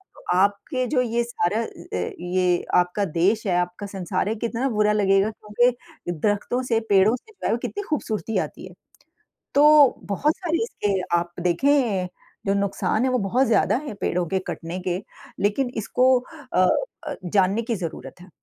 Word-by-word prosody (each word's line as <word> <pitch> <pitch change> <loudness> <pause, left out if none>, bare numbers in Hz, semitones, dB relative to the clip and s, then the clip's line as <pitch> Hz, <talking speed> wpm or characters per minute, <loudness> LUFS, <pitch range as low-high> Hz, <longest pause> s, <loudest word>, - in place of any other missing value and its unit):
तो - - -16
आपके 200 - +1
जो 255 -2 +2
ये 235 -1 0
सारा 225 -2 -1
अ - - -2
अ, 90 - -5
ये 180 0 +1
आपका 180 +3 +2
देश 190 +6 +1
है, 180 - +2
आपका 180 +3 -2
संसार 195 0 -2
है, 220 - -1
कितना 235 +4 -2
बुरा 210 -2 +2
लगेगा 195 0 +3
क्योंकि 240 - -1
दरख्तों 205 +8 -1
से 230 -3 +1
पेड़ों 200 +3 +5
से 345 - -14
पहले - - +1
कितनी 410 - -5
ख़ूबसूरती 225 -7 -2
आती - - -12
है। - - -14 0.8
तो 285 - +6 0.4
बहुत 290 +10 +1
सारे 335 +2 -1
इसके 205 - -1 0.2
आप 170 0 -2
देखें 200 +1 +2 0.4
जो 195 - +2
नुकसान 200 +3 0
है - - +2
वो 255 - +1
बहुत 245 +7 +1
ज़्यादा 220 -2 +3
हैं 220 - -5
पेड़ों 180 0 0
के 190 - 0
कटने 170 +2 -5
के, 180 0 0 0.4
लेकिन 230 +6 +1
इसको 255 +4 +3 0.4
अ 185 0 +5 0.4
अ, 295 - -3
जानने 195 +4 +2
की 230 0 -2
ज़रूरत 175 -1 -7
है। 185 - -14
210 Hz, 170 wpm, -23 LUFS, 185-245 Hz, 0.8 s, तो